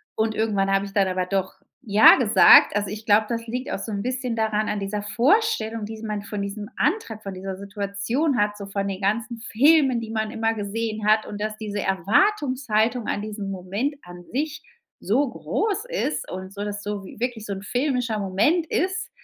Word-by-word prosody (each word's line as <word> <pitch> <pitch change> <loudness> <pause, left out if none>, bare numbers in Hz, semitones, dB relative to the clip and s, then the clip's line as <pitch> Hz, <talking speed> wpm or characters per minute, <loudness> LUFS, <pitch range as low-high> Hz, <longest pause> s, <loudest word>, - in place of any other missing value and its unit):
Und 220 0 0
irgendwann 200 -3 +1
habe 195 +1 +2
ich 195 - -10
dann 195 -2 +3
aber 185 0 -1
doch 190 0 -2 0.3
ja 215 -3 +7
gesagt. 225 -5 +7
Also 205 -2 0
ich 215 +2 -7
glaube, 215 0 +4
das 230 -1 -3
liegt 250 +4 -4
auch - - -2
so 220 - -5
'n 200 0 -3
bisschen 250 -2 -2
daran 215 -1 0
an 210 -1 -1
dieser 200 +1 -3
Vorstellung, 235 - +1
die 220 +1 -8
man 210 -1 -3
von 205 0 -5
diesem 205 +1 -5
Antrag, 225 - -1
von 195 - -6
dieser 190 0 -6
Situation 200 +8 -2
hat, 205 0 +1
so 200 - -7
von 200 0 -2
den 195 0 -4
ganzen 220 +3 -1
Filmen, 270 0 +4
die 225 -1 -7
man 220 -1 -2
immer 225 0 0
gesehen 215 0 -3
hat 215 0 +4
und 205 0 -7
dass 215 0 -3
diese 205 -2 -4
Erwartungshaltung 235 - +1
an 205 - -1
diesem 205 -2 -5
Moment 195 +10 -3
an 175 0 -11
sich 295 +4 -2 0.4
so 265 +7 +2
groß 425 - -2
ist - - -2
und 185 +1 -7
so 205 0 -5
das 205 0 -4
so 205 -1 -4
wi 190 - -12
wirklich 235 -3 -3
so 200 - -3
'n 195 +1 -7
filmischer 245 -2 -1
Moment 215 - +1
ist, 370 +3 -1
215 Hz, 200 wpm, -24 LUFS, 200-245 Hz, 0.4 s, ja